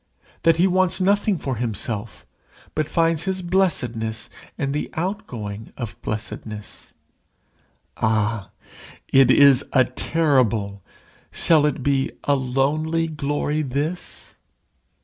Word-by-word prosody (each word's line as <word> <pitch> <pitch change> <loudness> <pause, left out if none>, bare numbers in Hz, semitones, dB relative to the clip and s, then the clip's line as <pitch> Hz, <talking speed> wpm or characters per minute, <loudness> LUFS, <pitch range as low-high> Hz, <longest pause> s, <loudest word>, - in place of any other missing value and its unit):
that 165 -1 +4
he 175 - +4
wants 185 -1 +2
nothing 200 +1 +2
for 135 -5 -3
himself, 110 -3 -4 0.5
but 155 -1 -1
finds 165 0 +1
his 190 -1 -2
blessedness 120 - 0 0.3
in 140 -1 -1
the 150 +2 -2
outgoing 125 - -4
of 115 -5 -5
blessedness. 105 0 -6 1.0
Ah! 110 -1 0 0.6
it 135 -1 +5
is 140 -2 +7
a 130 -2 +5
terrible 125 -9 +1 0.5
shall 155 -3 +3
it 135 -3 -3
be 135 -1 +1
a 145 - +2
lonely 145 +5 0
glory 150 -1 -1
this? 150 +6 -4
140 Hz, 110 wpm, -22 LUFS, 115-165 Hz, 1.0 s, is